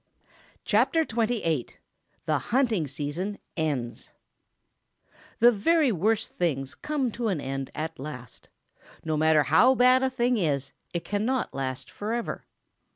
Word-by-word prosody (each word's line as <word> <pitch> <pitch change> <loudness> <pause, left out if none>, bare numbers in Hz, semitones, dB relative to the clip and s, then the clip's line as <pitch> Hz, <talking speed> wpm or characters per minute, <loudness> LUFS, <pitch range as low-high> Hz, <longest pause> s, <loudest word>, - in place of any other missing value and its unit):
CHAPTER 325 - +3
XXVIII 220 - 0 0.6
THE 155 -2 +1
HUNTING 220 - +1
SEASON 150 +9 -4 0.2
ENDS 140 -8 -3 1.2
The 240 +1 +7
very 280 +6 +3
worst 215 +4 0
things 135 -6 -2
come 290 -5 -2
to 235 +1 -3
an 190 -7 0
end 135 -1 -4
at 160 -1 -4
last. 125 -4 -9 0.6
No 155 -1 0
matter 155 0 +4
how 190 - +5
bad 255 +1 +5
a 265 - +2
thing 250 -1 +1
is, 140 -7 -1 0.2
it 170 - -4
cannot 225 +5 -1
last 130 -1 -4
forever. 225 +3 -4
185 Hz, 125 wpm, -27 LUFS, 145-240 Hz, 1.2 s, The